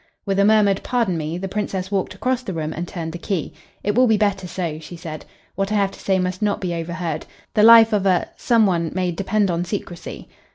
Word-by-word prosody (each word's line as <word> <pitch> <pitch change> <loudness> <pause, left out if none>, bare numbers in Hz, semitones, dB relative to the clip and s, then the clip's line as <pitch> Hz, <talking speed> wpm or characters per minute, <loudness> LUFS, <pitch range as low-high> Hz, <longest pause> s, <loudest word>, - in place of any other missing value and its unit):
With 195 -1 0
a 200 - +5
murmured 210 -2 +4
"Pardon 235 -7 0
me" 160 +1 -3
the 195 +2 -4
Princess 190 -1 -3
walked 190 -1 -1
across 255 +5 -1
the 215 -7 -5
room 160 -1 -3
and 175 +2 -4
turned 165 -3 -5
the 175 - -7
key. 180 -4 -3 0.3
"It 205 - +1
will 250 +3 +4
be 220 -2 +4
better 200 -3 0
so," 170 -4 -4
she 160 +2 -10
said. 165 -3 -8 0.3
"What 195 +1 -2
I - - +1
have 200 -1 +2
to - - -14
say 190 -1 +1
must 185 +1 -2
not 210 -1 +1
be 180 -2 -2
overheard. 170 -1 -4 0.3
The 215 - +3
life 225 0 +8
of 200 -2 +2
a 180 -2 +2
some 230 -3 +3
one 170 -4 0
may 185 -2 0
depend 195 +2 0
on 170 0 -1
secrecy." 175 -2 -6
190 Hz, 235 wpm, -21 LUFS, 175-210 Hz, 0.3 s, life